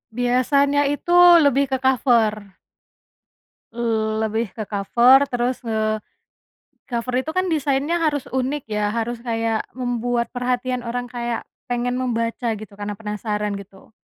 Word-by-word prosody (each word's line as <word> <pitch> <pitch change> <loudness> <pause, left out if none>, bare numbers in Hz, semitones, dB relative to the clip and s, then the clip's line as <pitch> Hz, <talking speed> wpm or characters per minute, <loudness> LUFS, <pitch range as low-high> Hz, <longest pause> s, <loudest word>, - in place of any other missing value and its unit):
Biasanya 280 +4 +2
itu 290 +4 -3 0.3
lebih 280 0 +3
ke 265 - +2
cover. 225 -6 +2 1.2
Le 220 -2 0
lebih 220 +1 -1
ke 220 - -4
cover 240 +7 +4
terus, 245 0 -1
eee, 215 -1 0 0.9
cover 245 0 -3
itu 295 - -5
kan 370 0 +1
desainnya 290 +2 0
harus 295 -4 0
unik 265 +2 -1
ya 210 -1 0
harus 230 +2 -3
kayak 225 -2 -2
membuat 245 -1 -1
perhatian 250 0 -1
orang 245 +1 -2
kayak, 240 -1 -3 0.2
pengen 245 0 -1
membaca 230 -2 -1
gitu 210 -1 -10
karena 205 0 -4
penasaran 210 0 -3
gitu, 195 +1 -14
240 Hz, 130 wpm, -22 LUFS, 220-260 Hz, 1.2 s, cover